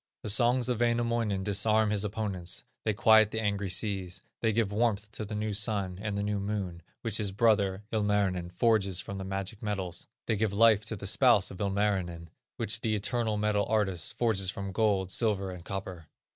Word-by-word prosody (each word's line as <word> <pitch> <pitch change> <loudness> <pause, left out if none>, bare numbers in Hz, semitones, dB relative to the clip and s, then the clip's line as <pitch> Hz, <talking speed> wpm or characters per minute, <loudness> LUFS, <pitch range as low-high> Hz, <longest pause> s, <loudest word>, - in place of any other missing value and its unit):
The 105 - +4
songs 120 +4 +4
of 125 -3 -1
Wainamoinen 115 -4 0
disarm 105 +2 +2
his 105 -1 0
opponents; 100 -4 -4 0.2
they 110 - +2
quiet 110 0 +6
the 110 - -3
angry 100 -2 -1
sea; 95 -1 -1 0.3
they 115 - +1
give 110 -2 0
warmth 105 -1 0
to 110 - -6
the 105 +1 -6
new 105 0 -2
sun 100 -3 0
and 105 -1 -3
the 100 - -1
new 105 0 -1
moon 100 -4 -3 0.2
which 110 -2 +1
his 105 -3 -2
brother, 100 -2 +2
Ilmarinen, 100 -5 0
forges 95 -1 +1
from 95 +2 -6
the - - -4
magic 95 +3 -4
metals; 95 -5 -4 0.2
they 110 - 0
give 105 -1 0
life 110 0 +5
to 110 - -3
the 100 - -8
spouse 105 -2 +4
of 95 - -8
Ilmarinen, 95 -4 -1 0.3
which 115 +1 -1
the 110 -1 0
"eternal 110 +1 -1
metal 105 -1 +1
artist" 100 -2 -1
forges 110 -6 +1
from 100 0 -5
gold, 95 -2 +1
silver, 100 -4 0
and 90 -2 -9
copper. 95 -5 -6
105 Hz, 185 wpm, -29 LUFS, 95-110 Hz, 0.3 s, quiet